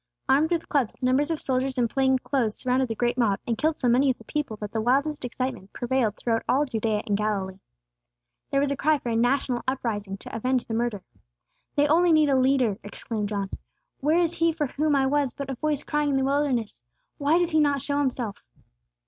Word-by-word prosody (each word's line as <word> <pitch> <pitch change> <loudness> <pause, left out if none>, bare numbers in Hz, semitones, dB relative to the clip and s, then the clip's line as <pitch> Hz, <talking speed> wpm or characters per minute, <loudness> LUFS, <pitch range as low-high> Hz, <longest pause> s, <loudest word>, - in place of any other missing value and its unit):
Armed 285 +4 +3
with 340 -2 -1
clubs, 270 -7 0
numbers 260 +4 +2
of 325 -2 -1
soldiers 260 0 -1
in 240 -1 +2
plain 265 +2 +2
clothes 245 -4 -1
surrounded 255 +1 +1
the 225 - -2
great 240 +2 0
mob, 205 -5 +2
and 235 - 0
killed 310 +6 0
so 250 - 0
many 255 +3 +4
of 255 - 0
the - - -15
people 285 -3 -3
that 210 0 -6
the 220 - -1
wildest 280 +6 +1
excitement 245 -5 -4
prevailed 240 -4 0
throughout 230 -1 0
all 285 +3 +3
Judea 220 -4 -1
and 205 - 0
Galilee. 200 -2 -2 0.9
There 275 - +1
was 280 0 +1
a - - 0
cry 305 +2 +2
for 245 - -5
a 230 - 0
national 245 +1 +1
uprising 210 -7 -2
to - - -9
avenge 250 +2 0
the 225 - -5
murder. 225 -4 -1 0.7
"They 290 0 +3
only 340 +3 +4
need 310 -2 +4
a 275 - +3
leader!" 255 -5 +2
exclaimed 205 0 -4
John. 200 -2 -3 0.5
"Where 305 +4 +2
is 345 -1 +2
He 335 0 +2
for 310 -2 -1
whom 295 +2 0
I 270 -1 +3
was 280 -1 0
but 275 -1 -5
a - - -2
voice 295 +2 -1
crying 295 0 0
in 275 - +1
the 265 - +1
wilderness? 270 -5 0 0.4
Why 295 +3 +3
does 350 -1 +1
He 315 - +3
not 285 -3 +2
show 285 0 -1
Himself?" 250 -6 -2
260 Hz, 215 wpm, -25 LUFS, 230-290 Hz, 0.9 s, many